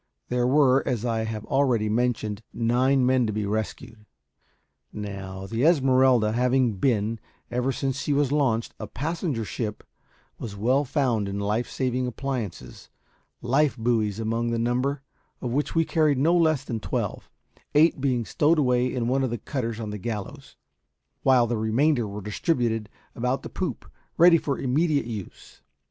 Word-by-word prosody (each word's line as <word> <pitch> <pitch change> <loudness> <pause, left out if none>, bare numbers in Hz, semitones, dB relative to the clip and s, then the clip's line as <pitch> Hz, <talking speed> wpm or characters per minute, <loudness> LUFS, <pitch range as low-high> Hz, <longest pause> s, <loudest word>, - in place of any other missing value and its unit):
There 125 0 +1
were, 135 -1 +4
as 120 -2 -1
I 115 -2 0
have 110 -1 -5
already 130 -6 +1
mentioned, 110 -2 -1
nine 125 +3 +2
men 130 -2 +3
to - - -1
be 105 0 -2
rescued. 110 +1 -4 0.9
Now, 95 -2 -6
the 115 +5 -2
Esmeralda 130 -7 +4
having 125 -2 +1
been, 110 -1 0 0.3
ever 125 +2 0
since 135 0 -2
she - - -2
was 140 -1 +2
launched, 130 -6 +1
a 110 - -5
passenger 150 - -3
ship, 105 0 -4 0.6
was 105 -4 -6
well 125 +8 +2
found 125 -7 0
in 100 - -4
life 105 +4 -1
saving 130 -1 -1
appliances, 125 -6 -5 0.5
life 135 +3 +2
buoys 110 -3 0
among 115 +1 -1
the 115 - -1
number, 125 +4 -1 0.4
of 120 - -4
which 145 +4 -1
we 165 0 +3
carried 155 -4 +2
no 160 +6 +3
less 155 -5 +3
than 115 -5 -4
twelve; - - -3 0.5
eight 155 -2 +4
being 125 -4 0
stowed 155 +8 +2
away 125 -3 +2
in 120 -3 -2
one 135 +2 +1
of 130 - 0
the 120 - -3
cutters 115 -1 -4
on 110 -2 -4
the 105 - -5
gallows, 120 +7 -6 0.7
while 130 -3 +4
the 120 0 -1
remainder 120 +3 +1
were 100 +1 -6
distributed 115 - -1 0.2
about 125 +3 -1
the - - -6
poop, 185 - -4 0.3
ready 170 0 +7
for 140 -2 -2
immediate 145 +2 +1
use. 110 -5 -9
125 Hz, 160 wpm, -25 LUFS, 110-135 Hz, 0.9 s, ready